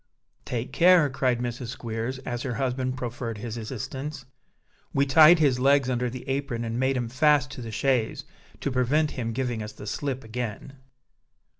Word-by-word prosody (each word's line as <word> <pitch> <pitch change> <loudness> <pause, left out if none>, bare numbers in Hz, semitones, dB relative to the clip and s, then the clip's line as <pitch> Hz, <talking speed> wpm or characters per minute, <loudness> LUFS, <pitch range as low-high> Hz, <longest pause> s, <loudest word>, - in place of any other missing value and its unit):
"Take 125 +1 -4
care," 175 -4 +5
cried 130 -2 +1
Mrs. 120 0 -4
Squeers, 120 +1 -4
as 120 -1 -3
her 125 -3 -3
husband 130 0 -1
proffered 120 -2 -4
his 110 +1 -5
assistance. 130 +5 -6 0.7
"We 140 0 +4
tied 155 +5 +8
his 140 -6 +3
legs 135 0 +3
under 125 0 0
the 125 +1 -8
apron 135 -4 -2
and 115 +1 -3
made 130 0 +1
'em 120 -2 -1
fast 140 +2 +3
to 135 - -7
the 115 - -6
chaise, 120 0 0 0.4
to 140 - -1
prevent 140 +5 +2
him 115 -3 -3
giving 120 -1 -2
us 105 0 -6
the 105 - -10
slip 135 +4 -3
again." 115 +2 -5
125 Hz, 170 wpm, -26 LUFS, 120-135 Hz, 0.7 s, tied